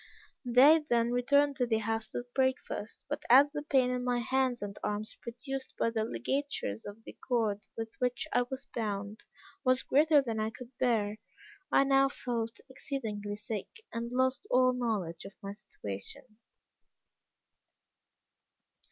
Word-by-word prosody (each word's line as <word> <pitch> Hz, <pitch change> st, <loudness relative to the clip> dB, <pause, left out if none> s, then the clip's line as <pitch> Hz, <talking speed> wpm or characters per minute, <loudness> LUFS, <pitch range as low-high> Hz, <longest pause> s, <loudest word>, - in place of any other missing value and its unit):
"They 270 Hz, +7 st, +7 dB
then 235 Hz, 0 st, +3 dB
returned 280 Hz, +3 st, +3 dB
to 245 Hz, -, +1 dB
the 225 Hz, -2 st, +2 dB
house 225 Hz, 0 st, -1 dB
to 245 Hz, -, -5 dB
breakfast; 260 Hz, -4 st, -1 dB
but 290 Hz, +1 st, -3 dB
as 275 Hz, +4 st, +8 dB
the 295 Hz, 0 st, -3 dB
pain 265 Hz, -4 st, +2 dB
in 250 Hz, 0 st, -1 dB
my 245 Hz, -1 st, +1 dB
hands 250 Hz, 0 st, +1 dB
and 200 Hz, 0 st, -5 dB
arms 210 Hz, +1 st, -3 dB
produced 260 Hz, +3 st, -6 dB
by 230 Hz, -, +1 dB
the 220 Hz, -1 st, 0 dB
ligatures 205 Hz, -, -2 dB
of 205 Hz, +2 st, -10 dB
the -, -, -10 dB
cord 220 Hz, -5 st, 0 dB
with 225 Hz, 0 st, -4 dB
which 250 Hz, +4 st, 0 dB
I 245 Hz, -, +4 dB
was 265 Hz, 0 st, -5 dB
bound, 205 Hz, -1 st, -3 dB, 0.4 s
was 255 Hz, -1 st, +3 dB
greater 300 Hz, +2 st, +5 dB
than 230 Hz, -5 st, -2 dB
I 215 Hz, 0 st, 0 dB
could 250 Hz, +2 st, -12 dB
bear, 215 Hz, -4 st, +1 dB, 0.5 s
I -, -, +6 dB
now 275 Hz, 0 st, +4 dB
felt 230 Hz, -4 st, -3 dB
exceedingly 220 Hz, -7 st, -4 dB
sick, 210 Hz, -1 st, -4 dB, 0.3 s
and 235 Hz, +1 st, -3 dB
lost 260 Hz, +8 st, +1 dB
all 255 Hz, 0 st, +4 dB
knowledge 210 Hz, -9 st, -2 dB
of 195 Hz, -, -10 dB
my 195 Hz, -, -6 dB
situation. 200 Hz, -, -7 dB
240 Hz, 150 wpm, -31 LUFS, 215-260 Hz, 0.5 s, as